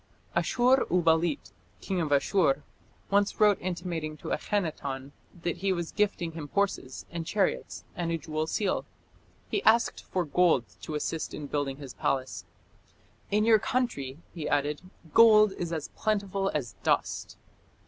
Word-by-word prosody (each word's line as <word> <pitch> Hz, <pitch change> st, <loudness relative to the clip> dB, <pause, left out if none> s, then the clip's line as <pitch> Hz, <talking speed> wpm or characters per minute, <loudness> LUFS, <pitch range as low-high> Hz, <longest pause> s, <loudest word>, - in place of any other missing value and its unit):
Ashur 255 Hz, +2 st, +3 dB
uballit, 165 Hz, -2 st, +2 dB, 0.3 s
king 190 Hz, -3 st, -2 dB
of 155 Hz, -3 st, -2 dB
Ashur, 145 Hz, -1 st, +3 dB, 0.5 s
once 200 Hz, 0 st, +2 dB
wrote 210 Hz, -2 st, +5 dB
intimating 170 Hz, -4 st, -3 dB
to -, -, -7 dB
Akhenaton 140 Hz, -8 st, -2 dB, 0.3 s
that 175 Hz, 0 st, -1 dB
he 195 Hz, +2 st, 0 dB
was 170 Hz, -3 st, -2 dB
gifting 200 Hz, -5 st, 0 dB
him 160 Hz, -2 st, -7 dB
horses 195 Hz, -10 st, -1 dB
and 170 Hz, -1 st, -3 dB
chariots 195 Hz, +3 st, -1 dB
and 170 Hz, -1 st, -2 dB
a 165 Hz, -, +1 dB
jewel 155 Hz, 0 st, -3 dB
seal. 195 Hz, +2 st, 0 dB, 0.7 s
He -, -, +1 dB
asked 230 Hz, -, +3 dB
for 180 Hz, -2 st, -2 dB
gold 160 Hz, -5 st, +3 dB, 0.2 s
to 155 Hz, -, -5 dB
assist 155 Hz, +2 st, -3 dB
in 150 Hz, -, -6 dB
building 140 Hz, -1 st, -2 dB
his 140 Hz, -3 st, -9 dB
palace. 130 Hz, -1 st, -2 dB, 0.8 s
"In 210 Hz, +1 st, +2 dB
your 225 Hz, -1 st, +6 dB
country", 190 Hz, -, -1 dB, 0.2 s
he 160 Hz, -4 st, -4 dB
added, 145 Hz, +1 st, 0 dB, 0.3 s
"gold 215 Hz, -2 st, +7 dB
is 175 Hz, -3 st, -4 dB
as 160 Hz, -3 st, -3 dB
plentiful 200 Hz, -2 st, -1 dB
as 120 Hz, -7 st, -3 dB
dust." -, -, 0 dB
170 Hz, 145 wpm, -28 LUFS, 150-200 Hz, 0.8 s, gold